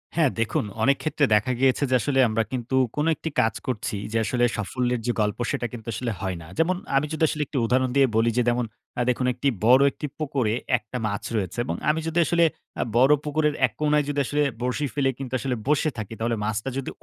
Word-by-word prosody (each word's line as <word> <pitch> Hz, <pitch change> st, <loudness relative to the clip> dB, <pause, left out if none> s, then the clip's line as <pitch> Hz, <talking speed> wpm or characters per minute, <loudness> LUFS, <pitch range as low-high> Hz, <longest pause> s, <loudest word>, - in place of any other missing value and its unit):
হ্যাঁ 160 Hz, -4 st, +4 dB
দেখুন, 115 Hz, -1 st, 0 dB, 0.2 s
অনেক 140 Hz, 0 st, +4 dB
ক্ষেত্রে 155 Hz, -2 st, +2 dB
দেখা 105 Hz, +5 st, +2 dB
গিয়েছে 135 Hz, +2 st, +3 dB
যে -, -, +5 dB
আসলে 135 Hz, +1 st, 0 dB
আমরা 110 Hz, +1 st, +1 dB
কিন্তু 125 Hz, 0 st, -2 dB, 0.2 s
কোন 150 Hz, +1 st, 0 dB
একটি 160 Hz, -, -5 dB
কাজ 110 Hz, -, +1 dB
করছি 110 Hz, -4 st, -2 dB, 0.2 s
যে 115 Hz, -, 0 dB
আসলে 120 Hz, +3 st, 0 dB
সাফল্যের 125 Hz, +4 st, -1 dB
যে -, -, +3 dB
গল্প 105 Hz, 0 st, 0 dB
সেটা -, -, -2 dB
কিন্তু 115 Hz, -2 st, -9 dB
আসলে 115 Hz, +2 st, -2 dB
হয় 95 Hz, -3 st, -3 dB
না। 80 Hz, -, -11 dB
যেমন, 165 Hz, +3 st, +2 dB, 0.2 s
আমি 150 Hz, -, +2 dB
যদি 155 Hz, -, -1 dB
আসলে 155 Hz, -, -3 dB
একটি 140 Hz, -, -4 dB
উদাহরণ 130 Hz, +2 st, +2 dB
দিয়ে 135 Hz, -1 st, +5 dB
বলি, 115 Hz, +1 st, +3 dB
যে 125 Hz, -, +4 dB
যেমন 120 Hz, 0 st, +2 dB, 0.3 s
আ -, -, +2 dB
দেখুন 125 Hz, +1 st, 0 dB, 0.4 s
বড় 130 Hz, +3 st, +7 dB
একটি 150 Hz, -, -5 dB
পুকুরে 135 Hz, -7 st, 0 dB, 0.2 s
১ -, -, -15 dB
টা 125 Hz, -, -2 dB
মাছ 100 Hz, -1 st, -3 dB
রয়েছে 95 Hz, -2 st, -2 dB
এবং -, -, -2 dB
আমি 155 Hz, +1 st, +2 dB
যদি 165 Hz, +1 st, 0 dB
আসলে 170 Hz, +1 st, +3 dB, 0.3 s
অ্যা -, -, -1 dB
বড় 130 Hz, +4 st, +6 dB
পুকুরের 150 Hz, 0 st, 0 dB
১ 125 Hz, -, -4 dB
কোনায় 150 Hz, -1 st, +3 dB
যদি 145 Hz, 0 st, -1 dB
আসলে 145 Hz, +3 st, 0 dB, 0.2 s
বরশি 125 Hz, +4 st, -1 dB
ফেলে 140 Hz, -2 st, +1 dB
কিন্তু 130 Hz, -2 st, -6 dB
আসলে 130 Hz, 0 st, -1 dB
বসে 150 Hz, +1 st, +2 dB
থাকি 110 Hz, 0 st, -5 dB
তাহলে 115 Hz, +1 st, 0 dB
মাছটা 110 Hz, +4 st, -2 dB
যদি 135 Hz, -, -3 dB
130 Hz, 220 wpm, -25 LUFS, 115-145 Hz, 0.4 s, বড়